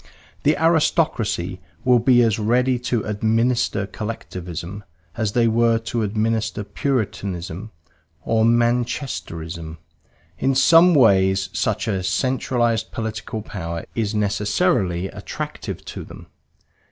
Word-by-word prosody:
The 150 - +2
aristocracy 150 - +1 0.3
will 125 -1 +5
be 120 +1 +5
as 110 -1 +1
ready 125 +4 +2
to 120 -2 -1
"administer" 110 0 +1
Collectivism 95 -2 -6 0.3
as 110 -3 -1
they 120 -1 +3
were 115 0 +3
to 115 +1 -3
administer 110 0 -1
Puritanism 100 - -3 0.5
or 110 -1 +2
Manchesterism; 110 - -1 0.6
in 135 0 +1
some 165 +5 +6
ways 95 -6 +4
such 110 +1 -1
a 95 -4 0
centralized 120 +2 0
political 110 -1 -4
power 85 -6 -5
is 110 -2 -1
necessarily 100 -3 +1
attractive - - -6
to - - -7
them. - - -12
110 Hz, 105 wpm, -22 LUFS, 95-120 Hz, 0.6 s, some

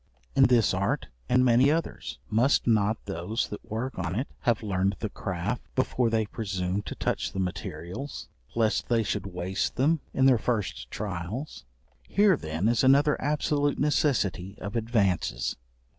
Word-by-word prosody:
In - - +7
this 120 -5 +4
art, 95 +1 -1 0.2
and 125 0 +4
many 125 +3 +5
others, 165 +2 -2
must 120 +6 +3
not 110 -1 +2
those 100 +4 -2
that 105 - -7
work 115 +1 -3
on 85 0 -2
it 130 - -2
have 120 -3 +1
learned 100 -1 0
the 110 - -4
craft 90 +6 -3
before 125 -2 +1
they 110 -1 +1
presume 95 -2 -2
to - - -5
touch - - -2
the - - -3
materials, 90 - -5 0.3
lest 110 -2 +1
they 115 -2 +3
should 100 - -2
waste 90 0 -2
them 155 +5 +2
in 130 - +2
their 130 -4 +6
first 100 - -2
trials? 100 - -5 0.4
Here 205 -2 +4
then 80 - -2
is 120 +2 +2
another 140 +3 +5
absolute 145 -1 +1
necessity 105 - +1
of 100 +3 -6
advances. 110 -6 0
110 Hz, 155 wpm, -27 LUFS, 95-130 Hz, 0.4 s, In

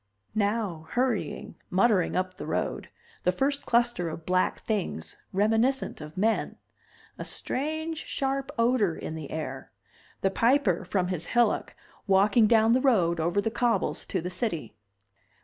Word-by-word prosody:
Now, 205 -6 -1
hurrying, 245 -4 -1
muttering 190 -2 +3
up 185 0 -1
the - - -6
road, - - -2 0.3
the 180 - +2
first 275 +8 -1
cluster 235 -7 +2
of 160 0 -8
black 185 0 +1
things 195 - -3 0.2
reminiscent 225 +4 +1
of 150 +2 -10
men. 220 +4 0 0.6
A - - -3
strange 315 +3 -3
sharp 270 -1 -2
odor 230 -7 +2
in - - -6
the 155 -3 -6
air. 135 -4 -5 0.5
The 195 - +2
Piper, 230 -6 +2
from 180 0 0
his 175 -3 -3
hillock, 240 -1 +1 0.3
walking 205 +3 +5
down 225 0 +5
the 255 +2 +4
road, 180 -11 +3
over 170 +4 +1
the 220 +2 0
cobbles, 235 0 0
to 185 - -1
the 180 +2 -4
city. 175 - -3
205 Hz, 145 wpm, -27 LUFS, 180-240 Hz, 0.6 s, walking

